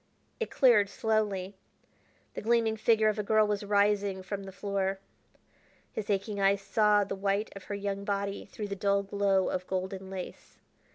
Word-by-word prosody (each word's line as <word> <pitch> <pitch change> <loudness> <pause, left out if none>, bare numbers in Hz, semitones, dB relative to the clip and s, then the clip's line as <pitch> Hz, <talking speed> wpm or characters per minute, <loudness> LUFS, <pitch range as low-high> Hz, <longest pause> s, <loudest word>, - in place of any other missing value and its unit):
It 455 - -2
cleared 225 -6 +4
slowly. 205 -3 -1 0.8
The - - -5
gleaming 230 0 +2
figure 220 0 +3
of 215 0 +1
a - - 0
girl 215 +1 +4
was 210 -1 -1
rising 200 -1 +1
from 200 0 -5
the 195 - -8
floor. 195 0 -2 1.0
His 215 - -5
aching 200 +1 -1
eyes 195 0 +3
saw 210 +1 +3
the 195 - -4
white 200 +2 -1
of 195 - -10
her 205 - -4
young 200 0 -3
body 200 0 -2
through 210 -2 -5
the 200 - -3
dull 200 0 +1
glow 200 -1 +1
of 185 0 -3
golden 190 0 -4
lace. 190 -2 -8
200 Hz, 170 wpm, -30 LUFS, 195-210 Hz, 1.0 s, cleared